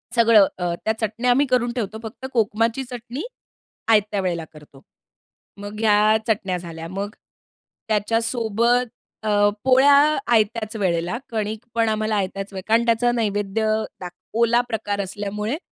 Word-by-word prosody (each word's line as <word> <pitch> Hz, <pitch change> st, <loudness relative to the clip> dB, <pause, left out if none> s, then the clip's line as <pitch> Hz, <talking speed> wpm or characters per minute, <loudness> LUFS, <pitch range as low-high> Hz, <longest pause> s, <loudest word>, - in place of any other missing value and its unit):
सगळं 225 Hz, -4 st, +6 dB
अ, 175 Hz, -1 st, -1 dB
त्या 220 Hz, -, +2 dB
चटण्या 225 Hz, +3 st, 0 dB
आम्ही 280 Hz, +4 st, +3 dB
करून 245 Hz, -2 st, +1 dB
ठेवतो. 220 Hz, -3 st, -3 dB
फक्त 225 Hz, +4 st, -8 dB
कोकमाची 230 Hz, +2 st, +1 dB
चटणी, 245 Hz, +3 st, -6 dB, 0.7 s
आयत्या 210 Hz, -2 st, +2 dB
वेळेला 170 Hz, -3 st, -2 dB
करतो. 145 Hz, -3 st, -16 dB, 0.8 s
मग 205 Hz, +1 st, -7 dB
ह्या 215 Hz, 0 st, +4 dB
चटण्या 195 Hz, -4 st, 0 dB
झाल्या 165 Hz, -2 st, -8 dB
मग, 200 Hz, +3 st, -5 dB, 0.7 s
त्याच्यासोबत 230 Hz, +2 st, +1 dB, 0.4 s
अ, 205 Hz, -1 st, +3 dB
पोळ्या 265 Hz, +2 st, +6 dB, 0.4 s
आयत्याच 220 Hz, 0 st, +1 dB
वेळेला. 180 Hz, 0 st, -1 dB
कणिक 220 Hz, 0 st, -3 dB
पण 230 Hz, -1 st, +2 dB
आम्हाला 215 Hz, 0 st, 0 dB
आयत्याच 195 Hz, 0 st, -3 dB
वेळेला 190 Hz, +1 st, -7 dB
कारण 230 Hz, +1 st, +4 dB
त्याचा 235 Hz, +1 st, +2 dB
नैवेद्य 210 Hz, -2 st, -1 dB, 0.3 s
दाख 180 Hz, -1 st, -7 dB, 0.3 s
ओला 235 Hz, +1 st, +4 dB
प्रकार 205 Hz, -3 st, -2 dB
असल्यामुळे 205 Hz, +5 st, -4 dB
215 Hz, 135 wpm, -22 LUFS, 200-230 Hz, 0.8 s, सगळं